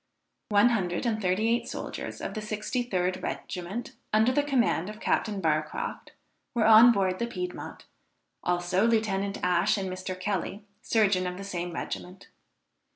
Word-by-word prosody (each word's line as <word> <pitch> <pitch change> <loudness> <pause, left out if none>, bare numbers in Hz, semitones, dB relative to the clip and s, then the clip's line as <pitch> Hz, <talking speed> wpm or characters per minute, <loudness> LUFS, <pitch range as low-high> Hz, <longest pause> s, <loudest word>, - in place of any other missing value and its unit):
One 210 +3 +5
hundred 185 -4 -1
and 220 -2 0
thirty 190 +3 +1
eight 235 +1 +1
soldiers - - -6
of - - -4
the 215 - -4
63d 210 -3 -2
regiment, 185 +7 -5 0.2
under 220 +3 +4
the 290 - +3
command 245 - +1
of 215 0 -9
Captain 210 -3 0
Barcroft, 155 -3 -2 0.4
were 225 -2 +3
on 225 +2 +9
board 190 -4 +1
the 235 - -1
Piedmont; 360 +9 -6 0.6
also 180 +4 +1
Lieutenant 200 -3 0
Ash 180 +4 +3
and 190 -2 -3
Mr. 185 0 -5
Kelly, 200 +1 -2 0.2
surgeon 195 -6 +2
of 180 0 -4
the 195 - -6
same 175 -3 -4
regiment. 180 +2 -6
200 Hz, 150 wpm, -28 LUFS, 185-225 Hz, 0.6 s, on